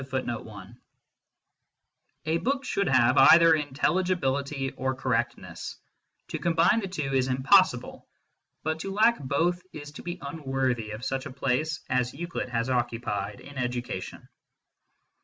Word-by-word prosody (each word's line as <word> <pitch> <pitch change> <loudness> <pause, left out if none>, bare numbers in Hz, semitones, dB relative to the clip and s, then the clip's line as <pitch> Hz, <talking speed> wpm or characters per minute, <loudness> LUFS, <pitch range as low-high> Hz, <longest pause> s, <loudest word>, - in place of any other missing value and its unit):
1 130 -2 -3 1.9
A 160 +1 +1
book 270 +5 -1
should 200 -1 0
have 130 0 +4
either 165 +4 +8
intelligibility 145 -2 0
or 130 0 -2
correctness; 125 -3 -3 0.5
to - - -4
combine 170 +5 +3
the 200 - -4
two 150 -7 -3
is 130 -1 +2
impossible, 130 +1 +3 0.6
but 160 +1 -1
to 195 - -4
lack 220 +4 +3
both 165 +6 0
is 145 -1 -8
to 150 - -10
be 175 0 -5
unworthy 135 -6 -2
of 110 +3 -6
such 135 +2 -2
a - - -9
place 140 +4 -1
as 125 0 0
Euclid 170 -3 -4
has 115 0 -1
occupied 120 -5 -2
in 140 -2 -9
education. 120 -6 -4
135 Hz, 130 wpm, -27 LUFS, 125-165 Hz, 1.9 s, either